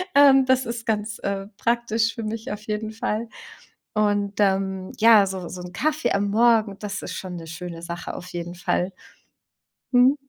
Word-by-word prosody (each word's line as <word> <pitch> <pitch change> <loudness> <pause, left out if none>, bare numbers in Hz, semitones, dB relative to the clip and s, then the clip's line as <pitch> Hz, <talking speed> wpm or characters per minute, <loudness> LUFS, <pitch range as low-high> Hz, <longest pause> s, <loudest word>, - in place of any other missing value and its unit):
Ähm, 275 -2 +7
das 260 0 +3
ist 235 -1 -5
ganz, 215 0 -1
äh, 195 0 -2
praktisch 230 -1 +1
für 230 - -5
mich 220 +1 -4
auf 210 0 -5
jeden 215 0 -2
Fall. 220 +1 -2 0.7
Und, 205 -1 +1
ähm, 190 -1 +1
ja, 220 -2 +7
so 190 -2 -5
so 180 0 -7
'n 180 0 -9
Kaffee 300 +3 0
am 200 0 +1
Morgen, 220 -2 +3
das 210 -1 -5
ist - - -5
schon 185 -2 -6
'ne 165 -1 -8
schöne 170 0 -7
Sache 170 0 -5
auf 180 - -8
jeden 175 0 -5
Fall. 180 +1 -1 1.0
Mhm. 250 +2 +6
210 Hz, 175 wpm, -24 LUFS, 190-230 Hz, 1.0 s, Ähm